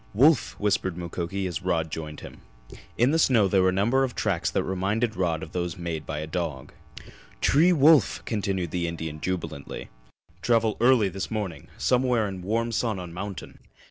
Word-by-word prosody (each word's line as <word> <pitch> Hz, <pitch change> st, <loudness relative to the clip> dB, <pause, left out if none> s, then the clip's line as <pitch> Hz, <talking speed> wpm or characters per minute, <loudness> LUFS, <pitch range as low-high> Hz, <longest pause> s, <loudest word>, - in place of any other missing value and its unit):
"Wolf!" 135 Hz, +2 st, +4 dB
whispered 95 Hz, -4 st, 0 dB
Mukoki 90 Hz, +2 st, -4 dB
as 90 Hz, -2 st, -3 dB
Rod 80 Hz, -4 st, -1 dB
joined 75 Hz, -1 st, -6 dB
him. -, -, -11 dB, 0.6 s
In 120 Hz, +4 st, +4 dB
the 165 Hz, -, +2 dB
snow 120 Hz, -9 st, +4 dB
were 95 Hz, -1 st, +3 dB
a -, -, +2 dB
number 115 Hz, +8 st, +2 dB
of 125 Hz, -3 st, -2 dB
tracks 95 Hz, -6 st, 0 dB
that -, -, 0 dB
reminded 100 Hz, +5 st, -1 dB
Rod 85 Hz, -4 st, -1 dB
of 80 Hz, -, -9 dB
those 90 Hz, -1 st, -3 dB
made 85 Hz, -3 st, -4 dB
by -, -, -3 dB
a 75 Hz, -, -3 dB
dog. 80 Hz, -5 st, -4 dB, 0.7 s
"T'ree 165 Hz, +6 st, +4 dB
wolf!" 155 Hz, -2 st, +4 dB
continued 95 Hz, -6 st, -2 dB
the 85 Hz, -1 st, -1 dB
Indian 80 Hz, -2 st, -5 dB
jubilantly. 80 Hz, -6 st, -4 dB, 0.5 s
"Travel 115 Hz, -2 st, +2 dB
early 120 Hz, -4 st, +5 dB
this 95 Hz, +1 st, -5 dB
morning. 95 Hz, -8 st, -4 dB
Somewhere 125 Hz, -3 st, +2 dB
in 95 Hz, -2 st, -6 dB
warm 115 Hz, +5 st, -1 dB
sun 115 Hz, -2 st, -1 dB
on 90 Hz, -2 st, -7 dB
mountain!" 100 Hz, +1 st, -7 dB
95 Hz, 175 wpm, -26 LUFS, 85-115 Hz, 0.7 s, early